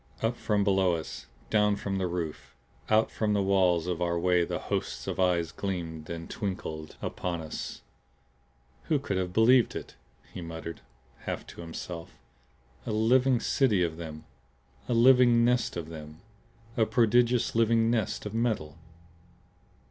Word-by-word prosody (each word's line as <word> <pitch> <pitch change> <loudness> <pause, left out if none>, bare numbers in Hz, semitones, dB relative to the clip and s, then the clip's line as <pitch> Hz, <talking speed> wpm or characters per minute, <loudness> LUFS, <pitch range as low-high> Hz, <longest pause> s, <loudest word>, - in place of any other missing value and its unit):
Up 115 +2 +1
from 105 -3 0
below 95 -3 +3
us, 80 -1 -7 0.2
down 105 -1 +3
from 95 -1 -3
the 95 - 0
roof, 80 -7 -5 0.3
out 110 +1 +3
from 105 -1 0
the 100 -1 +2
walls 95 -4 +3
of 90 -1 -2
our 85 -1 +1
way 90 0 +3
the - - -2
hosts - - -3
of - - -4
eyes 85 -3 +2
gleamed 85 -5 -4
and 85 -1 -5
twinkled 80 -7 -5
upon 85 -2 -3
us. 80 -1 -6 1.0
"Who 155 - +2
could 100 -9 -2
have 90 -1 -1
believed 115 +5 +4
it?" - - -6 0.4
he 90 - -6
muttered, 85 0 -7 0.4
half - - -4
to - - -10
himself. 85 0 -7 0.7
"A - - -1
living 125 +4 +3
city 110 -7 +2
of 80 -2 -2
them! 80 -2 -7 0.7
A 120 - +2
living 120 -1 +6
nest 125 -6 +1
of 80 -2 -5
them; 75 0 -10 0.5
a 110 -2 +2
prodigious 120 +1 +3
living 115 0 +3
nest 110 -4 -1
of 105 - -5
metal!" 110 -10 -1
95 Hz, 150 wpm, -28 LUFS, 85-115 Hz, 1.0 s, living